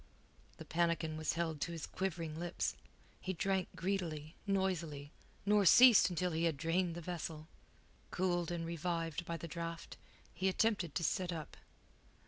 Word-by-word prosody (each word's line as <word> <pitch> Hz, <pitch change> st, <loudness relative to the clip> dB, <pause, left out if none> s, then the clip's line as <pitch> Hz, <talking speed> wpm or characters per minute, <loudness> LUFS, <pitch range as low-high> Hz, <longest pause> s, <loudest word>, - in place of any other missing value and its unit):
The -, -, -9 dB
pannikin 165 Hz, -2 st, 0 dB
was 155 Hz, 0 st, -1 dB
held 160 Hz, -3 st, -2 dB
to 170 Hz, -, -1 dB
his 165 Hz, -2 st, -4 dB
quivering 165 Hz, -4 st, -3 dB
lips. 175 Hz, 0 st, -2 dB, 0.4 s
He 190 Hz, -, -3 dB
drank 190 Hz, +1 st, 0 dB
greedily, 165 Hz, -4 st, -2 dB
noisily, 170 Hz, -7 st, -1 dB, 0.3 s
nor 205 Hz, 0 st, +4 dB
ceased 240 Hz, +3 st, +8 dB
until 180 Hz, 0 st, -1 dB
he 165 Hz, +1 st, 0 dB
had 160 Hz, -4 st, +1 dB
drained 165 Hz, +3 st, 0 dB
the 175 Hz, -, -5 dB
vessel. 160 Hz, -2 st, -5 dB, 0.6 s
Cooled 175 Hz, -2 st, 0 dB
and 170 Hz, -1 st, -3 dB
revived 170 Hz, 0 st, -2 dB
by 170 Hz, 0 st, -3 dB
the 170 Hz, -, -7 dB
draught, 165 Hz, 0 st, -6 dB, 0.4 s
he 190 Hz, +2 st, +1 dB
attempted 190 Hz, -6 st, +1 dB
to 180 Hz, -, 0 dB
sit 180 Hz, +3 st, 0 dB
up. 160 Hz, -3 st, -6 dB
170 Hz, 150 wpm, -36 LUFS, 160-185 Hz, 0.6 s, ceased